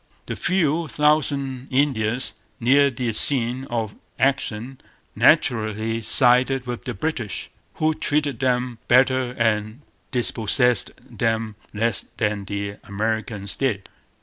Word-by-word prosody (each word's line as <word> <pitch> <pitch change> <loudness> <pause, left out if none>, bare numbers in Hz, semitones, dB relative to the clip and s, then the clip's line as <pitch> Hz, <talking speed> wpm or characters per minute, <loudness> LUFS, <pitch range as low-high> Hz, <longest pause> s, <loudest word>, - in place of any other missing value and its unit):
The - - -4
few 170 -3 +1
thousand 140 -4 0
Indians 125 -4 0 0.3
near 140 +4 +4
the 120 -2 -3
scene 125 +2 +3
of 115 -5 -3 0.2
action 130 -2 -1 0.3
naturally 110 0 +2
sided 125 +3 +3
with 120 -1 -6
the 125 - -4
British, 120 -3 -3 0.2
who 155 0 +1
treated 145 -5 -1
them 125 -2 0
better 130 0 +3
and 110 +2 0 0.3
dispossessed 125 -1 +2 0.2
them 115 -1 -1 0.2
less 115 0 -1
than 105 -2 -1
the 100 0 -4
Americans 105 -1 -1
did. 115 -8 -1
120 Hz, 110 wpm, -22 LUFS, 110-135 Hz, 0.3 s, near